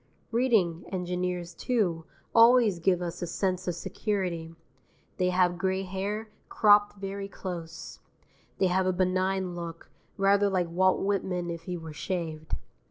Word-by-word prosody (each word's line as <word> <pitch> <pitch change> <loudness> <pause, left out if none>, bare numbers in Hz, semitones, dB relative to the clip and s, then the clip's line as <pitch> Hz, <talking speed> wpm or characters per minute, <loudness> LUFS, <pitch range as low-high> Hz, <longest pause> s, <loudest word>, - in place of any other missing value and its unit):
Reading 220 -9 +2
engineers, 180 -1 -2
too, 175 -7 0 0.3
always 230 -5 +6
give 180 +1 +2
us 170 +1 -5
a 175 - -2
sense 185 +1 -1
of 175 - 0
security. 180 -4 -3 0.6
They 180 0 +2
have 180 -1 +2
gray 190 0 0
hair, 200 +4 -3 0.2
cropped 205 -1 +5
very 195 0 -5
close. 170 -4 -7 0.6
They - - +2
have 185 +1 +2
a 185 - +2
benign 185 0 0
look, 170 -1 -7 0.3
rather 200 +1 +4
like 180 -3 0
Walt 185 +2 +3
Whitman 185 -3 -1
if 165 0 -7
he 180 -1 -3
were 160 -2 -8
shaved. 160 -2 -3
185 Hz, 140 wpm, -28 LUFS, 175-195 Hz, 0.6 s, always